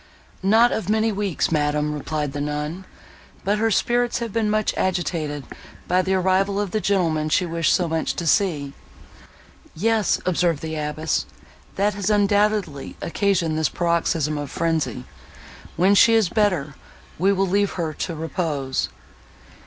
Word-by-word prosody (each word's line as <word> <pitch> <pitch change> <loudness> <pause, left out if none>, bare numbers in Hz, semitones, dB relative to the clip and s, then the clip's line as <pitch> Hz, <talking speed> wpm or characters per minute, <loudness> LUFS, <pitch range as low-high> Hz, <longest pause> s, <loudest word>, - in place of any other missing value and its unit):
"Not 225 +5 +4
of 205 -3 -3
many 220 +1 +2
weeks, 200 -6 -1
madam," 150 -1 +1
replied 150 -1 -3
the 145 - -3
nun, 150 +5 -4 0.6
"but 205 +2 +1
her 225 +1 +2
spirits 240 +3 +1
have 235 -4 -4
been 225 -2 +1
much 215 0 +1
agitated 165 -6 -1 0.4
by 180 +1 +3
the 190 +1 0
arrival 190 +2 +1
of 205 -3 -2
the 215 - -1
gentleman 165 -7 +1
she 180 +4 +2
wished 165 -1 0
so 180 -2 +2
much 160 0 -1
to 170 - -4
see." 155 -6 +1 1.0
"Yes," 220 +3 +1
observed 170 -4 +1
the 160 0 -4
abbess, 150 +1 -2 0.5
"that 205 +2 +1
has 200 0 -2
undoubtedly 205 -7 +1
occasioned 170 -4 0
this 160 - +1
paroxysm 165 -3 0
of 145 -2 -5
frenzy. 160 -6 -1 0.7
When 185 +4 +4
she 225 +3 +6
is 220 -6 +3
better, 180 -9 +1 0.5
we 190 +3 +3
will 195 0 +1
leave 200 +2 +1
her 165 -3 -3
to 170 +2 -4
repose." 155 -5 -2
180 Hz, 150 wpm, -22 LUFS, 155-205 Hz, 1.0 s, she